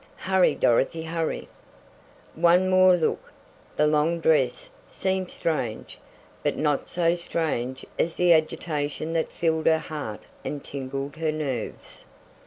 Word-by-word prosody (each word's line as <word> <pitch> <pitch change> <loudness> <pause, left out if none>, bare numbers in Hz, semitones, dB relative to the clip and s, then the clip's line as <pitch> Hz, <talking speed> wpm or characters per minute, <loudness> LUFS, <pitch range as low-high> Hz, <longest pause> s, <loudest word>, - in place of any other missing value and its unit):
Hurry, 190 -1 +2
Dorothy! 135 +7 +2
Hurry! 165 0 -3 0.9
One 175 +3 +4
more 185 0 +6
look! 165 -3 -1 0.4
The 150 - +3
long 155 +3 +2
dress 140 -7 +2 0.2
seemed 190 -1 -2
strange, 125 -9 -3 0.4
but - - -1
not 150 -2 0
so 170 -1 +2
strange 155 -7 -2
as 165 0 +1
the 180 -1 +5
agitation 155 -1 -1
that 165 -1 -1
filled 160 -1 0
her 160 - +5
heart 145 -10 -6 0.2
and 145 -1 -5
tingled 140 +2 -5
her 160 -1 0
nerves. 140 -7 -5
160 Hz, 125 wpm, -25 LUFS, 145-170 Hz, 0.9 s, more